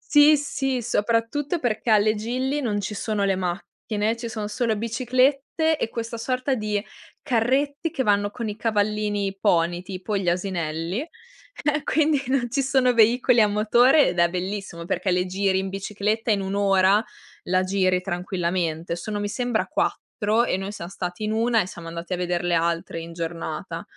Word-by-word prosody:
Sì, 295 +1 +8
sì, 270 -2 -1
soprattutto 235 +8 0
perché 240 -4 -2
alle 215 0 +4
Gili 255 +6 -2
non 210 -5 -1
ci 205 +1 -4
sono 210 -1 -1
le 195 -1 +2
macchine, 200 +4 -2
ci 235 0 -6
sono 215 -2 -4
solo 225 +1 0
biciclette 255 +7 +1
e 260 - -2
questa 230 0 -5
sorta 255 +3 -1
di 215 -4 -1 0.4
carretti 275 +6 +1
che 270 - -2
vanno 205 -2 +2
con 230 +2 -5
i 210 - -4
cavallini, 210 -2 0
i 195 0 -3
pony 175 -3 +2
tipo, 190 +3 -5
gli 195 -3 +1
asinelli, 175 0 -2
eh, 340 - -5
quindi 300 -2 +2
non 255 -2 +1
ci 275 +2 +1
sono 265 -2 +3
veicoli 235 +1 +4
a 210 - +5
motore 240 +8 +4
ed 175 - -3
è 170 - +5
bellissimo 185 -1 -4
perché 185 +2 -1
le 180 0 +2
giri 190 +1 0
in 190 0 -2
bicicletta, 210 +3 -2
in 205 -2 +2
1 190 0 -3
ora 200 +1 +4 0.4
la 185 +1 +2
giri 185 -1 +2
tranquillamente. 175 -2 -2
Sono 205 +4 -4
mi 205 - -2
sembra 245 0 -1
4 215 +2 0
e 190 - 0
noi 195 +1 -4
siam 170 -4 -7
stati 180 +1 -5
in 215 - -1
1 225 0 +2
e - - -7
siamo 170 -3 -9
andati 170 +2 -5
a - - -1
veder 175 -1 -1
le 175 0 0
altre 170 0 0
in 165 +1 -8
giornata. 165 0 -5
210 Hz, 180 wpm, -24 LUFS, 185-245 Hz, 0.4 s, Sì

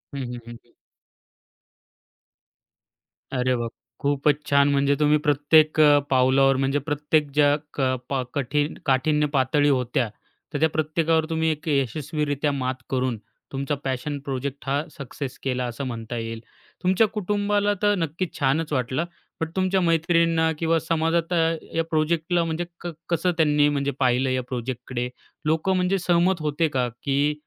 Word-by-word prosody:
हं, - - -3
हं, 120 - -6
हं. 120 0 -13 2.6
अरे 130 0 +1
बाप 120 -1 -3
रे! - - -64 0.3
खूपच 145 +1 +2
छान 140 0 +4
म्हणजे 140 0 +2
तुम्ही 150 0 +4
प्रत्येक 150 +2 +4
अ, 145 -1 +7
पावलावर 135 +1 +4
म्हणजे 135 +2 +1
प्रत्येक 150 +1 0
ज्या 145 0 +4 0.2
क - - -3 0.3
पा 135 -2 0
कठीण 145 +2 0
काठिन्य 150 +3 +2
पातळी 145 +2 +3
होत्या. 125 -3 +1 0.5
तर 145 - -1
त्या 160 +2 +3
प्रत्येकावर 155 +1 +1
तुम्ही 160 0 +1
एक 155 +1 -6
यशस्वीरित्या 145 +1 -1
मात 130 -2 -2
करून, 130 -3 0 0.3
तुमचा 140 +2 -2
पॅशन 135 +2 -3
प्रोजेक्ट 135 0 -4
हा 140 +1 +1 0.2
सक्सेस 135 -1 -6
केला 125 -2 -1
असं 120 +3 -5
म्हणता 115 -1 -5
येईल. 115 0 -4 0.4
तुमच्या 190 +4 +4
कुटुंबाला 205 0 0
तर 205 0 +3
नक्कीच 165 +1 -3
छानच 150 +3 +1
वाटलं, 130 +4 0 0.4
बट 160 - -1
तुमच्या 190 0 +2
मैत्रिणींना 165 -1 +2
किंवा 165 0 +2
समाजात 165 +2 0 0.4
या 165 - +2
प्रोजेक्टला 165 +2 +1
म्हणजे 165 +1 -2 0.2
क 175 - -5 0.2
कसं 175 +1 +1
त्यांनी 150 -2 +4
म्हणजे 140 -1 0
पाहिलं 130 0 +2
या 130 0 0
प्रोजेक्टकडे? 125 0 -4 0.4
लोकं 160 +5 +1
म्हणजे 185 +1 +1
सहमत 175 0 +3
होते 155 +2 +1
का, 130 -4 0 0.2
की 140 +1 +1
145 Hz, 145 wpm, -24 LUFS, 135-165 Hz, 2.6 s, अ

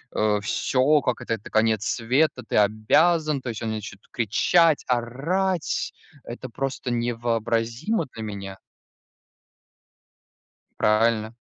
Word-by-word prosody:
э, 105 -1 +2
всё, 135 +7 +2
как 125 - -1
это - - -2
это 105 - -6
конец 110 -1 +2
света: 130 +3 +1
"Ты - - -3
обязан!" 145 +9 +3
То 130 - -5
есть 110 -1 -5
они 110 -1 -2
начнут 100 -2 -8
кричать, 150 - +3
орать. 150 +10 -1 0.3
Это 120 +1 -8
просто 130 +1 -4
невообразимо 120 - -1
для 110 - -7
меня. 100 -2 -7 2.2
Правильно 110 +1 +2
115 Hz, 110 wpm, -24 LUFS, 110-135 Hz, 2.2 s, обязан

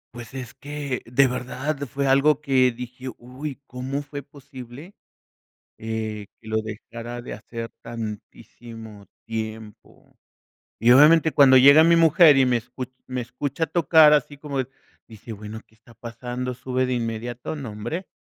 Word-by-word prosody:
Pues 120 +2 -10
es 125 -4 -7
que 145 -3 -5
de 135 +3 +4
verdad 125 +4 -3
fue 140 +2 -3
algo 140 +2 +4
que 130 -4 +3
dije: 125 +2 -9
"Uy, 130 +4 -8
¿cómo 135 +3 -5
fue 145 0 -7
posible, 140 - -12 0.8
eh 110 -2 -5
que 110 - -13
lo 110 - -1
dejara 115 +2 -8
de 120 - -7
hacer 115 +2 -7
tantísimo 115 -1 -9 0.2
tiempo?" 110 -1 -8 0.6
Y 120 +2 +4
obviamente 155 +3 +6
cuando 130 -2 +7
llega 140 +4 +8
mi 170 +1 +5
mujer 165 -2 +6
y 130 - +5
me 125 -1 +2
escu 125 +2 -5 0.2
me 130 0 -3
escucha 140 +6 -3
tocar 160 -1 +5
así 145 0 0
como 140 -2 -5
de 130 0 -2 0.4
dice: 110 +1 -10
"Bueno, 105 +1 -8
¿qué 110 - -28
está 115 +2 -20
pasando?" 120 +2 -5
Sube 130 +1 -2
de 130 - -1
inmediato, 120 +4 -4
¿no, 135 -6 -6
hombre? 120 - -5
125 Hz, 150 wpm, -23 LUFS, 115-140 Hz, 0.8 s, llega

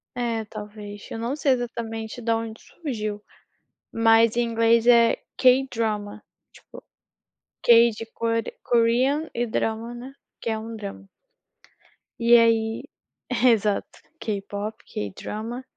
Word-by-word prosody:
É 230 -2 -2
talvez, 210 -1 -9
eu - - -5
não 235 +5 -2
sei 290 -2 +1
exatamente 230 -2 -3
da 230 0 +1
onde 225 0 -6
surgiu, 215 -9 -5 0.7
mas 225 0 +4
em 240 - +3
inglês 230 0 +3
é 235 -1 +6 0.2
K-Drama, 225 -5 +1 0.3
tipo, - - -15 0.8
K 235 0 +7
de 225 +1 -7
Kore 230 0 -1
Korean 250 +6 +2
e 240 - 0
drama, 225 +1 -2
né, 250 +3 -9 0.3
que - - -3
é 220 -1 -1
um 225 +1 -7
drama. 200 -2 -8 1.1
E 235 0 +6
aí, 225 0 +3 0.6
exato, 215 -4 +2 0.2
K-Pop, 205 0 -4 0.2
K-Drama. 215 - -5
230 Hz, 120 wpm, -24 LUFS, 215-235 Hz, 1.1 s, K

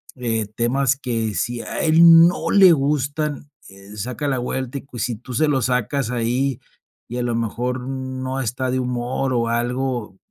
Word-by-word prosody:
eh, 115 -4 -2
temas 130 +3 +1
que 115 -5 -2
si 120 +7 -2
a - - -5
él 165 +1 +7
no 175 - -2
le 195 -3 +7
gustan, 145 +1 -1 0.2
eh, 100 +2 -13
saca 125 +7 -4
la 135 -2 0
vuelta 130 +2 -3
y, - - -12
pues 120 -6 -6
si 120 - -2
tú 125 +3 -10
se 155 +6 +2
lo 140 -3 +1
sacas 125 +1 0
ahí, 125 +2 -1 0.5
y 120 - -5
a 125 - -1
lo 120 -1 -1
mejor 120 +3 -2
no 130 0 -4
está 125 +1 -2
de 130 - 0
humor 125 +1 -2
o 120 -1 +1
algo, 120 -3 -2
125 Hz, 180 wpm, -21 LUFS, 120-135 Hz, 0.5 s, él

